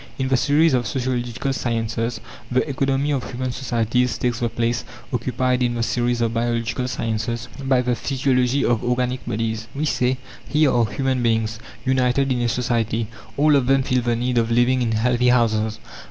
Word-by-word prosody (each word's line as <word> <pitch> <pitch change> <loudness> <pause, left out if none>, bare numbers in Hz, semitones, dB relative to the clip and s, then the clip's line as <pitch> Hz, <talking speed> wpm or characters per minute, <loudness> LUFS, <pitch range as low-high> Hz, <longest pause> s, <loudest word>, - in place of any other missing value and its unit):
In 130 -1 -1
the 135 - +3
series 150 +5 +3
of 120 -3 +1
sociological 125 +1 -2
sciences, 115 -1 -2 0.3
the 130 +4 +1
economy 135 +1 0
of 135 -3 0
human 130 0 -3
societies 125 -1 0
takes 120 -2 -1
the 120 - 0
place, 115 +1 -1 0.3
occupied 125 +1 0
in 120 -1 +1
the 115 - -1
series 120 0 0
of 115 -1 +1
biological 115 +1 -1
sciences 115 0 -2 0.2
by 130 -2 +3
the 125 0 +1
physiology 130 +2 +1
of 120 -2 +1
organic 125 +1 -1
bodies. 110 0 -2
We 150 +3 -1
say, 125 -3 +1 0.3
here 150 -2 +3
are 120 -2 +2
human 130 +5 -1
beings, 115 -1 0 0.3
united 130 +1 +2
in 125 -1 0
a 120 - +1
society. 115 -2 -1 0.3
All 150 +1 +5
of 135 -3 +2
them 135 0 +3
feel 130 -1 +1
the 120 0 0
need 120 +1 +1
of 115 0 0
living 120 +2 +3
in 115 -2 0
healthy 125 +2 +2
houses. 110 -3 +2
125 Hz, 180 wpm, -22 LUFS, 115-130 Hz, 0.3 s, All